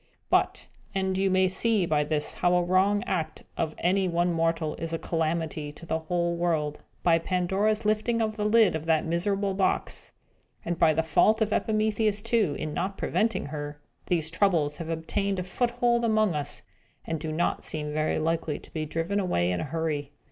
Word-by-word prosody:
But - - +2 0.3
and 190 -1 0
you 195 +1 +2
may 185 0 +4
see 205 +1 +2
by 150 -3 +2
this 150 0 -1
how 180 0 +2
a 180 - +3
wrong 190 +3 +2
act 170 -4 -3
of 160 -1 -2
any 190 +2 +2
one 175 0 +1
mortal 165 -1 0
is 165 0 -4
a - - +1
calamity 160 -2 -2
to 170 - -12
the 160 -1 -1
whole 170 +1 -1
world 160 -4 0 0.2
by 165 -1 +4
Pandora's 195 +5 0
lifting 215 +2 +1
the 215 -2 -1
lid 215 -3 +5
of 160 +1 -5
that 160 -2 +3
miserable 195 +4 0
box, 190 0 -1 0.5
and 170 0 -2
by 155 -1 +5
the 160 - +2
fault 210 +7 +3
of 215 -1 +1
Epimetheus, 215 -1 +1
too, 225 -10 +1
in 155 - -4
not 195 +4 -2
preventing 225 +1 0
her, 145 0 -6 0.3
these 160 -3 0
Troubles 165 -6 +2
have 165 -2 -6
obtained 195 +5 -1
a 180 - -2
foothold 240 +4 +1
among 215 -4 +3
us, 145 -1 -3 0.4
and 160 -1 -2
do 155 0 -4
not 160 +3 0
seem 150 -1 -3
very 155 0 0
likely 160 -1 -1
to - - -15
be 155 -1 -3
driven 165 +6 -1
away 90 - +1
in 90 - -1
a - - -2
hurry. 150 -2 -2
175 Hz, 185 wpm, -27 LUFS, 160-200 Hz, 0.5 s, lid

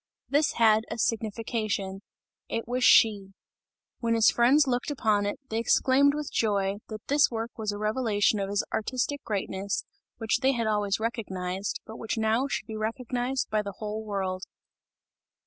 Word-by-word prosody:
This 295 +2 +2
had 220 -1 +4
a - - -4
signification 215 -3 -2 0.5
it 230 - -3
was 250 +1 -1
She. 205 -6 +5 0.7
When 230 -2 +1
his 225 -1 +5
friends 265 +6 +4
looked 250 +1 -1
upon 215 -7 +1
it, 205 - -3
they 225 - -1
exclaimed 275 +4 +3
with 300 -1 -4
joy, 200 -2 +1
that 215 -1 -8
this 285 +1 +4
work 230 0 -4
was 215 -3 -2
a 205 - -5
revelation 215 -1 +1
of 195 0 -2
his 200 0 0
artistic 255 +5 -2
greatness, 200 -1 -3 0.3
which 225 -1 0
they 270 0 +3
had 235 -2 -1
always 210 -2 0
recognized, 195 -4 -3
but 220 - -9
which 225 - -3
now 225 +4 +1
should 275 - -3
be 220 0 -7
recognized 245 +4 -2
by 215 0 +2
the 200 -1 -6
whole 215 +2 -5
world. 190 -3 -3
220 Hz, 165 wpm, -27 LUFS, 205-245 Hz, 0.7 s, She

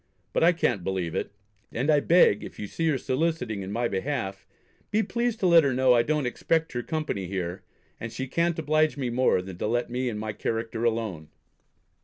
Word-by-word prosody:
But - - +2
I 170 - +7
can't 120 - 0
believe 90 -3 -2
it; - - -3 0.4
and 135 +7 +1
I 150 - +5
beg 165 - +4
if - - -9
you 105 - -5
see 165 +10 -2
her 145 - +2
soliciting 130 -6 -1
in 95 +1 -6
my 120 +3 0
behalf, 100 -2 -3 0.4
be 220 +1 +2
pleased 235 +2 -1
to - - +2
let 170 -2 +7
her 135 -3 +1
know 130 -1 +5
I 120 - +5
don't 150 +2 0
expect 160 +6 0
her 120 - -1
company 155 - -3
here, 90 -1 -4 0.4
and 115 - -5
she 130 - -4
can't 170 +5 0
oblige 155 -1 +1
me 130 -3 -2
more 120 -6 +2
than 95 -2 -9
to - - -1
let 120 +2 -1
me 125 +1 -1
and 105 -2 -4
my 110 0 -4
character 115 +2 -3
alone. 110 -9 -1
125 Hz, 210 wpm, -26 LUFS, 105-155 Hz, 0.4 s, I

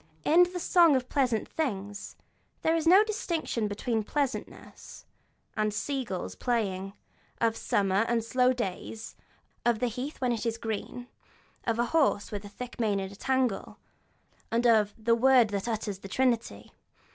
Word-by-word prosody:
In 350 +3 +6
the 360 - -4
'Song 340 -3 +5
of 255 -1 -1
Pleasant 250 -6 +1
Things' 205 -9 -4 0.5
there 320 - +3
is 325 0 0
no 380 +5 +8
distinction 340 - -2
between 220 +3 -1
the 215 - -4
pleasantness 280 0 -4 0.5
of 215 -1 +1
sea 275 +3 -2
gulls 190 -6 -5
playing, 195 -6 -2 0.5
of 225 -1 +2
summer 195 -1 +1
and 235 -1 +1
slow 250 +2 +2
long 255 - +3
days, 220 0 -5 0.5
of 240 -2 +2
the 250 - 0
heath 250 +5 -4
when 250 -2 +1
it 230 - -2
is 230 -1 -1
green, 230 +2 -5 0.6
of 230 -1 0
a 240 - +2
horse 285 -10 +2
with 205 -1 -5
a 205 - -9
thick 245 +4 -9
mane 210 -4 +1
in 190 0 -5
a - - -11
tangle, 260 -2 -1 0.7
and 235 +1 0
of 215 -3 +4
'the 230 +1 +2
word 245 -1 +5
that 200 +1 -3
utters 215 -4 -3
the 195 - -9
Trinity.' 240 +1 -1
235 Hz, 170 wpm, -28 LUFS, 210-260 Hz, 0.7 s, no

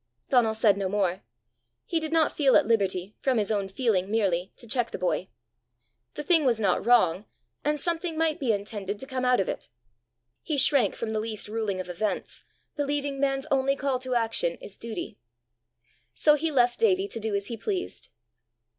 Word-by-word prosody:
Donal 235 -4 +3
said 215 -3 +4
no 190 -1 -1
more. 190 -2 0 0.6
He 335 - 0
did 315 -1 -5
not 320 -1 +2
feel 275 -4 +4
at - - +5
liberty, 200 -3 0
from 260 -3 +1
his 210 -1 0
own 200 -2 0
feeling 195 -3 0
merely, 190 -4 0
to - - -13
check 235 +1 0
the - - -5
boy. 185 0 -1 0.9
The - - -4
thing 330 -1 +4
was 240 -4 +2
not 195 -4 +1
wrong, 210 -5 +3 0.4
and 295 +1 0
something 335 0 -2
might 320 0 +1
be 260 -6 +1
intended 205 -1 -3
to 265 - -7
come 260 -2 -3
out 250 0 +4
of 190 - 0
it! - - -4 0.7
He 305 - -2
shrank 270 0 +3
from 220 -1 -4
the 215 - 0
least 215 -1 -3
ruling 210 -3 -2
of 185 - -5
events, 185 +2 -3 0.3
believing 285 -1 -2
man's 270 -1 0
only 275 0 +2
call 275 -2 -1
to 255 -1 -3
action 225 -7 +1
is 200 - -10
duty. 225 - -6 1.0
So 300 - +5
he 310 +2 0
left 245 -4 +2
Davie 395 -3 +3
to 305 - -6
do 220 -1 -2
as 200 0 -1
he 235 - -4
pleased. 370 - -4
235 Hz, 190 wpm, -27 LUFS, 205-280 Hz, 1.0 s, at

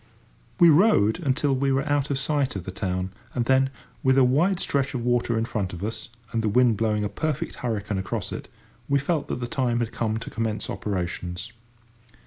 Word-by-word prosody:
We 170 -2 +8
rowed 160 - +5
until 140 -2 +1
we 135 +1 +1
were 135 +2 +1
out 145 -1 +1
of 140 - 0
sight 140 -2 0
of 95 - -4
the 95 - -6
town, 95 -1 -2 0.2
and 120 -2 +1
then, 135 +1 +4 0.3
with 130 0 +3
a 135 - +7
wide 165 +9 +3
stretch 140 -1 0
of 120 -1 -2
water 120 -1 +1
in 110 - +1
front 100 -6 -3
of 90 +2 -6
us, 110 +1 -4 0.2
and 115 - 0
the 110 - +1
wind 120 +1 +4
blowing 105 -1 0
a - - +1
perfect 155 +6 -3
hurricane 110 -4 -2
across 95 - -3
it, - - -6 0.4
we 140 - +4
felt 145 +2 -1
that 125 - -3
the - - -1
time 120 -1 0
had 120 -1 -1
come 110 -1 -1
to 115 - -6
commence 110 -2 -2
operations. 90 +1 -4
120 Hz, 205 wpm, -25 LUFS, 105-140 Hz, 0.4 s, We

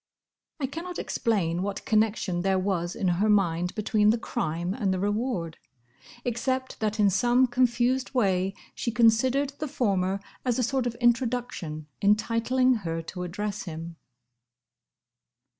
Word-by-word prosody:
I 280 - 0
cannot 335 +6 -6
explain 180 -8 0
what 200 +1 -4
connection 215 -5 +1
there 190 +1 +2
was 185 -2 -1
in 195 - -1
her 185 +5 +2
mind 180 -4 +2
between 210 0 +2
the 225 - +4
crime 175 -6 -2
and 210 -5 0
the 190 - 0
reward, 205 -4 -2 0.7
except 260 +2 -2
that 215 0 -1
in 205 -2 +5
some 245 +6 +4
confused 250 +1 +1
way 195 -4 +1 0.2
she - - -3
considered 240 +4 +3
the 305 - -2
former 195 -8 0 0.2
as 245 -3 0
a 250 - +1
sort 255 +1 0
of 235 - -3
introduction 240 - 0 0.2
entitling 230 +5 +3
her 165 -2 -3
to 180 +2 -7
address 205 +3 -4
him. 165 0 -7
215 Hz, 140 wpm, -27 LUFS, 185-245 Hz, 0.7 s, in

